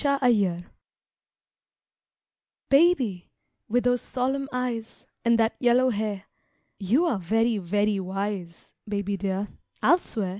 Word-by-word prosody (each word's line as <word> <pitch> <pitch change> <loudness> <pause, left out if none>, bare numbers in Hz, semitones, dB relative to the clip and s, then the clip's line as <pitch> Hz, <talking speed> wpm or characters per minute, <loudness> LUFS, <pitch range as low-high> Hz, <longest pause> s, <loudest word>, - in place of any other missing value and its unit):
TO 280 -1 +2
A 245 - +6
BABY 180 -6 0 2.1
Baby, 275 - +3 0.4
with 245 +3 +2
those 245 0 +2
solemn 270 +2 -2
eyes 245 -3 -4 0.2
And 235 0 +4
that 225 0 +2
yellow 250 +1 +3
hair 205 -2 -3 0.6
You 230 - +2
are 250 - 0
very, 225 +4 +1
very 205 +3 0
wise, 190 -2 -5 0.2
Baby 200 -1 -2
dear, 195 +1 -2 0.4
I'll 350 - +5
swear! 210 - -4
220 Hz, 120 wpm, -26 LUFS, 195-250 Hz, 2.1 s, A